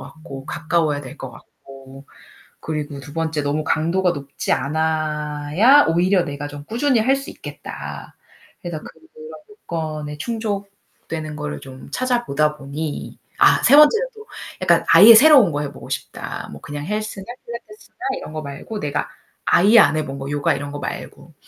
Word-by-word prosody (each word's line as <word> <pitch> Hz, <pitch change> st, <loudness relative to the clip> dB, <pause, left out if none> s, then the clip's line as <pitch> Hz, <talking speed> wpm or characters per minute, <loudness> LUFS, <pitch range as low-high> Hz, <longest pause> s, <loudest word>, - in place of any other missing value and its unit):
같고 140 Hz, -4 st, -10 dB
가까워야 160 Hz, -3 st, 0 dB
될 135 Hz, +1 st, -10 dB
것 135 Hz, -, -7 dB
같고. 135 Hz, +2 st, -15 dB, 0.5 s
그리고 150 Hz, -3 st, -4 dB
2 145 Hz, +2 st, -11 dB
번째 160 Hz, -2 st, -1 dB
너무 150 Hz, +2 st, -1 dB
강도가 175 Hz, +3 st, +1 dB
높지 140 Hz, -2 st, -4 dB
않아야 155 Hz, -, +2 dB
오히려 180 Hz, +3 st, +3 dB
내가 145 Hz, -1 st, -5 dB
좀 145 Hz, 0 st, -9 dB
꾸준히 240 Hz, -, +1 dB
할 265 Hz, +5 st, +3 dB
수 275 Hz, -, -7 dB
있겠다. -, -, -9 dB, 0.5 s
그래서 170 Hz, -3 st, -5 dB
그런 -, -, -11 dB, 0.6 s
조건에 155 Hz, -, -6 dB
충족되는 200 Hz, -7 st, -5 dB
거를 150 Hz, 0 st, -5 dB
좀 130 Hz, -1 st, -12 dB
찾아보다 195 Hz, -, 0 dB
보니 145 Hz, +2 st, -6 dB, 0.2 s
아, -, -, +5 dB
3 280 Hz, +4 st, +7 dB
번째는 440 Hz, +12 st, +6 dB
또 430 Hz, +1 st, -12 dB, 0.4 s
약간 -, -, +3 dB
아예 230 Hz, +2 st, +10 dB
새로운 260 Hz, -, +7 dB
거 145 Hz, -, -2 dB
해 145 Hz, -, -4 dB
보고 -, -, -12 dB
싶다. -, -, -5 dB
뭐 -, -, -10 dB
그냥 145 Hz, 0 st, -7 dB
헬스나 210 Hz, -1 st, -4 dB, 0.2 s
필라테스나 235 Hz, -, -11 dB, 0.2 s
이런 -, -, -9 dB
거 155 Hz, -, -5 dB
말고 145 Hz, +9 st, -7 dB
내가 145 Hz, 0 st, -2 dB, 0.4 s
아예 210 Hz, +6 st, +6 dB
안 155 Hz, -, +4 dB
해 155 Hz, -, 0 dB
본 135 Hz, 0 st, -6 dB
거. 135 Hz, -, -6 dB
요가 145 Hz, -1 st, +1 dB
이런 145 Hz, 0 st, -6 dB
거 145 Hz, -, -5 dB
말고. 160 Hz, +2 st, -7 dB
155 Hz, 305 characters per minute, -21 LUFS, 145-210 Hz, 0.6 s, 아예